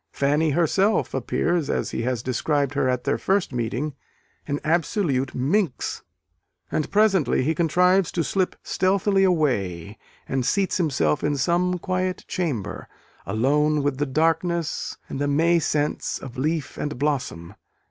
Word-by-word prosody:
Fanny 150 +3 +1
herself 175 +7 +2
appears, 160 +5 0
as - - -1
he - - -2
has 120 -1 -2
described 140 +2 0
her 135 -2 +1
at 125 -1 -1
their - - 0
first 190 -7 0
meeting, 125 +5 -2 0.5
an 145 0 -1
absolute 155 -4 0
minx. 150 +4 0 0.7
And 155 - -1
presently 195 -10 +3
he 155 +5 +1
contrives 180 +3 +3
to 170 - 0
slip 185 +3 0
stealthily 195 +1 +2
away, 105 - 0 0.3
and 135 -1 -1
seats 195 +9 +1
himself 130 - +1
in 145 -1 +1
some 175 +6 +1
quiet 185 +1 -2
chamber, 120 - -3 0.4
alone 145 +8 +2
with 145 -1 -1
the 145 - 0
darkness 165 +3 0
and 135 - -5
the 145 - 0
May 165 +4 +3
scents 150 -1 -1
of 130 -3 -9
leaf 155 +2 -2
and 150 -3 -3
blossom. 125 - -2
150 Hz, 140 wpm, -24 LUFS, 130-175 Hz, 0.7 s, presently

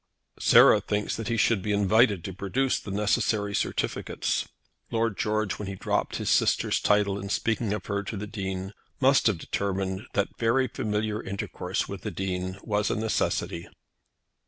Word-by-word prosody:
"Sarah - - +7
thinks 105 0 -1
that 115 -2 -5
he 115 - 0
should 110 -2 +3
be 105 - -2
invited 105 -1 +3
to 95 - -5
produce 100 +9 0
the - - -9
necessary 105 +1 0
certificates." - - -1 0.4
Lord 115 -2 0
George, 110 -2 -1
when 105 - -5
he 100 - -4
dropped - - -1
his - - -1
sister's - - +2
title 100 -1 +2
in 100 0 -6
speaking 110 +1 0
of 105 -2 -3
her 100 0 -1
to 105 - -4
the 105 - -4
Dean, 95 -2 -5 0.3
must 135 -1 +4
have 105 -5 +2
determined 95 +3 -3
that 100 0 -1
very 120 +3 +2
familiar 110 -4 -2
intercourse 100 +1 -3
with - - -7
the - - -3
Dean 95 0 -3
was 105 -1 0
a - - 0
necessity. 110 -5 -1
105 Hz, 165 wpm, -27 LUFS, 95-110 Hz, 0.4 s, Sarah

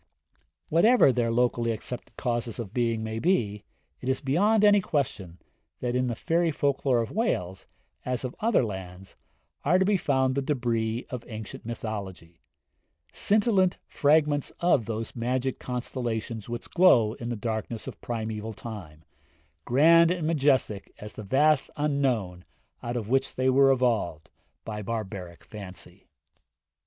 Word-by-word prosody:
Whatever 210 - +5
their 120 -1 +1
locally 120 0 +1
accepted 115 +2 -5
causes 120 -2 -2
of 110 -4 -6
being 115 -2 0
may 110 0 -3
be, 110 - 0 0.4
it 130 - -4
is 130 - +1
beyond 200 +11 +3
any 205 -1 +6
question 105 - -2 0.4
that 125 0 -2
in 125 0 +1
the 120 - -2
fairy 165 +6 +1
folk 140 -2 0
lore 125 -3 +3
of 115 - -7
Wales, 95 - -2 0.4
as 125 0 -2
of 125 - -5
other 225 - +3
lands, 95 -2 -8 0.5
are 170 +6 +4
to 190 - +2
be 205 0 +3
found 130 -5 +1
the 140 - 0
débris 120 -5 -1
of 125 -2 -5
ancient 110 -1 -8
mythology 100 -7 -6 0.7
scintillant 200 -3 +2
fragments 145 -1 +2
of 160 -10 +2
those 115 0 -4
magic 125 +2 -1
constellations 120 -3 -4
which 120 0 -5
glow 120 -12 +5
in 120 -1 -6
the 120 - -2
darkness 110 0 -4
of - - -9
primeval 110 -1 -4
time, 95 -9 -9 0.6
grand 165 +6 +6
and 175 -3 -1
majestic 135 -10 +1
as 105 0 -9
the - - -8
vast 140 +7 +2
Unknown 130 -12 0 0.4
out 120 +1 -3
of 110 -4 -4
which 135 +3 0
they 130 0 +2
were 135 +1 +5
evolved 115 - 0 0.3
by 105 -1 -5
barbaric 95 -5 -5
fancy. 95 -2 -11
120 Hz, 145 wpm, -27 LUFS, 110-140 Hz, 0.7 s, any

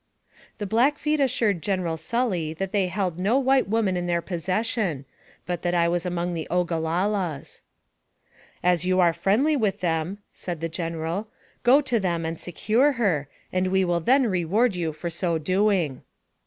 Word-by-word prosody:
The 205 - -4
Blackfeet 290 +8 +2
assured 225 - +1
General 185 -4 -1
Sully 180 -5 -1
that 195 +3 -3
they 200 -3 +1
held 180 -2 -2
no 205 +8 +2
white 270 0 +3
woman 210 -4 +1
in 175 0 -2
their 170 -1 +1
possession, 185 - -1 0.4
but 175 -1 -3
that 175 0 0
I 170 -1 +3
was 175 +1 -1
among 175 0 -2
the 165 -2 -4
Ogalallas. 175 -1 -1 0.5
" - - -32
As 175 - -1
you 185 0 +2
are 175 -2 +4
friendly 210 - +2
with 215 -8 0
them," 165 +2 -1 0.2
said 175 -3 -5
the 165 +1 -3
General, 165 +4 -3 0.3
"go 260 +4 +6
to 255 -5 0
them 170 -4 -1
and 165 0 -4
secure 230 - +1
her, 185 - 0 0.3
and 185 0 +1
we 190 0 +2
will 175 -1 +1
then 260 - +3
reward 195 +3 +1
you 170 -3 -1
for 165 +3 -5
so 170 0 0
doing." 185 -4 +1
185 Hz, 170 wpm, -25 LUFS, 170-215 Hz, 0.5 s, go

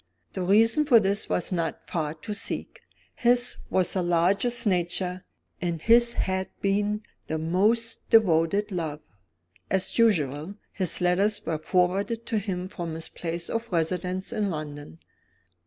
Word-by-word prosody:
The 190 - -3
reason 225 +9 +4
for 245 -6 +7
this 200 -1 -1
was 180 - -1
not 165 -3 -2
far 155 -2 -2
to 210 +7 -6
seek. 205 - -4 0.3
His 245 0 +2
was 185 -2 +1
the 185 - 0
largest 185 +8 +1
nature, 180 -1 0 0.4
and 170 -2 -1
his 235 +5 +4
had 190 0 -1
been 205 +2 0 0.2
the 160 - -2
most 210 +8 0
devoted 200 -1 +3
love. 160 -5 -3 0.7
As 190 +4 0
usual, 160 - +2 0.2
his 185 -2 -1
letters 200 +4 +2
were 160 -2 -2
forwarded 195 +7 0
to 225 -3 0
him 185 -3 -3
from 170 -4 -5
his 160 - -6
place 170 0 -5
of 230 0 -3
residence 180 +2 -1
in 210 -2 0
London. 145 - -6
185 Hz, 140 wpm, -26 LUFS, 170-210 Hz, 0.7 s, for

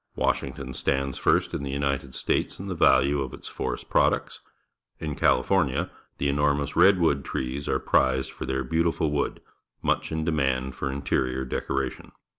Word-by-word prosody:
Washington 65 -1 -1
stands 70 0 -1
first - - +2
in - - -2
the 70 - -4
United 70 -1 -2
States - - -1
in 95 - -7
the 95 - -2
value 70 -4 +4
of 65 -2 -4
its - - -11
forest 65 -2 -4
products. - - +1 0.6
In 75 -2 -4
California 80 +3 +2 0.3
the 70 - 0
enormous 70 0 +1
red 95 +3 +6
wood 70 -5 +2
trees 65 +3 -3
are - - +2
prized 65 0 +1
for - - -7
their 65 0 -1
beautiful 80 +2 0
wood, 75 - -1 0.4
much - - 0
in 80 0 -2
demand 65 -5 0
for 70 - -3
interior 65 -1 -1
decoration. 65 0 -3
70 Hz, 160 wpm, -26 LUFS, 65-75 Hz, 0.6 s, red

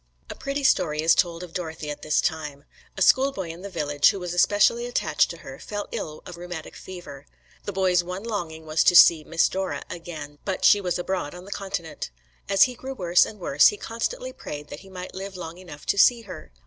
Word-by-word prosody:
A - - -7
pretty 275 +1 -3
story 155 - +2
is 165 +1 +6
told 170 -1 +1
of 175 -2 -10
Dorothy 160 -4 -5
at 145 - -7
this 155 - +1
time. 150 -3 -3 0.3
A 190 - +3
schoolboy 260 -9 +3
in 165 +2 -8
the 200 - -7
village, 145 -5 +3
who 195 - -2
was 180 -1 -4
especially 205 +6 +3
attached 160 -10 +1
to 170 - -7
her, 135 0 -9
fell 205 -1 -5
ill 155 -1 -5
of 175 - -9
rheumatic 175 -2 -7
fever. 145 -7 -10 0.4
The - - -3
boy's 185 -2 +2
one 180 +3 -6
longing 170 -8 -4
was 155 0 +2
to 180 - +5
see 165 -2 +8
"Miss 165 +2 +2
Dora" 190 0 -3
again, 155 -4 -8
but 190 -2 -2
she 205 - +6
was 180 -2 -1
abroad 175 -4 -3
on 180 +1 -10
the 200 - -11
Continent. 190 - -4 0.4
As 195 -1 +6
he 250 - +1
grew 265 +2 -7
worse 175 -4 +4
and 210 - -10
worse, 145 -5 +5
he 210 - 0
constantly - - -4
prayed 145 0 -8
that - - -8
he 195 - -15
might 185 -1 -8
live 195 0 -7
long 170 0 -7
enough 165 -5 -11
to 200 - +1
see 240 +2 +6
her. 185 - -10
180 Hz, 220 wpm, -25 LUFS, 160-195 Hz, 0.4 s, see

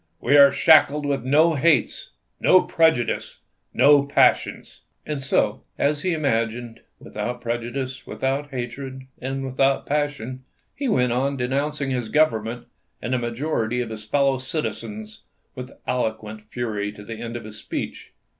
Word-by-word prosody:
We 140 +4 +2
are 140 -1 +8
shackled 150 -1 +5
with 140 -3 -1
no 155 +6 +4
hates, 150 -4 +1 0.3
no 185 - +5
prejudices, 160 -8 +1 0.3
no 145 0 +6
passions." 140 - +1 0.2
And 150 -2 -3
so, 130 - +1
— - - -45
as 145 +1 +1
he 185 - 0
imagined, 120 -5 -1
— - - -47
without 125 0 -5
prejudices, 120 +3 -4
without 135 +2 -2
hatred, 130 +1 -6 0.2
and 135 +1 -4
without 135 +1 +1
passion, 140 -4 -2 0.3
he 280 0 -3
went 125 - +2
on 135 +3 0
denouncing 140 +3 -1
his 125 -4 -2
Government 120 -6 +1 0.3
and 125 - -3
the 130 - +1
majority 120 -1 -2
of 120 -2 -3
his 110 -1 -7
fellow 135 +3 +1
citizens 210 +10 -5 0.3
with 125 -1 -7 0.2
eloquent 110 -3 -2
fury 105 -2 -4
to 105 - -12
the 115 +1 -7
end 120 0 -5
of 120 - -9
his 110 -1 -10
speech. - - -6
130 Hz, 150 wpm, -23 LUFS, 120-145 Hz, 0.3 s, are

